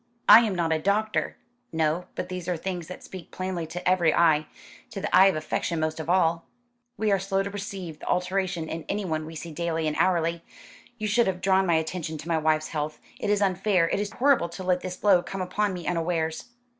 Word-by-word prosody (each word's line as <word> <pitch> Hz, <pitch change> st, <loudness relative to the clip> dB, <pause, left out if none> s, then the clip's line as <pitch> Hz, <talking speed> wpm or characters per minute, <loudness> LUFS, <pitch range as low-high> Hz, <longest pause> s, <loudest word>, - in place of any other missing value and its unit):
"I -, -, +11 dB
am 220 Hz, -5 st, 0 dB
not 165 Hz, -2 st, +1 dB
a 160 Hz, -, 0 dB
doctor." 210 Hz, +5 st, 0 dB, 0.3 s
"No; 160 Hz, +2 st, 0 dB
but -, -, -3 dB
these 180 Hz, -1 st, -6 dB
are 180 Hz, -2 st, 0 dB
things 175 Hz, -1 st, -4 dB
that 180 Hz, -, -9 dB
speak 185 Hz, -3 st, -10 dB
plainly 185 Hz, -3 st, -4 dB
to 175 Hz, +3 st, -5 dB
every 180 Hz, -3 st, +4 dB
eye 155 Hz, -2 st, +3 dB, 0.4 s
to 210 Hz, -, -6 dB
the 205 Hz, -, 0 dB
eye 190 Hz, +1 st, +8 dB
of 190 Hz, -, +2 dB
affection 160 Hz, +2 st, -2 dB
most 155 Hz, 0 st, -2 dB
of 160 Hz, +1 st, -5 dB
all." 170 Hz, -2 st, +2 dB, 0.5 s
"We 215 Hz, -1 st, +1 dB
are 195 Hz, -, +3 dB
slow 195 Hz, +1 st, 0 dB
to 200 Hz, -, -5 dB
perceive 195 Hz, -5 st, -6 dB
the -, -, -10 dB
alteration 180 Hz, -2 st, -1 dB
in 160 Hz, 0 st, -5 dB
anyone 165 Hz, -6 st, -2 dB
we 160 Hz, -, -9 dB
see 165 Hz, +1 st, -7 dB
daily 165 Hz, 0 st, -2 dB
and 155 Hz, -1 st, -1 dB
hourly. 170 Hz, -2 st, +1 dB, 0.5 s
You 215 Hz, -, -4 dB
should 235 Hz, +3 st, +3 dB
have 185 Hz, -1 st, -1 dB
drawn 190 Hz, 0 st, +2 dB
my 170 Hz, -, +3 dB
attention 160 Hz, 0 st, -2 dB
to 155 Hz, +2 st, -9 dB
my 165 Hz, -2 st, +1 dB
wife's 155 Hz, 0 st, +1 dB
health. 150 Hz, -1 st, -3 dB, 0.2 s
It 205 Hz, -, -2 dB
is 205 Hz, 0 st, +2 dB
unfair, 190 Hz, -2 st, +2 dB
it -, -, 0 dB
is 205 Hz, 0 st, -3 dB
horrible 260 Hz, -9 st, +3 dB
to 180 Hz, +3 st, -8 dB
let 180 Hz, -1 st, +1 dB
this 180 Hz, -1 st, -5 dB
blow 195 Hz, -4 st, +4 dB
come 190 Hz, +1 st, -5 dB
upon 205 Hz, +3 st, 0 dB
me 180 Hz, -3 st, -6 dB
unawares." 165 Hz, -2 st, -1 dB
180 Hz, 220 wpm, -26 LUFS, 160-195 Hz, 0.5 s, I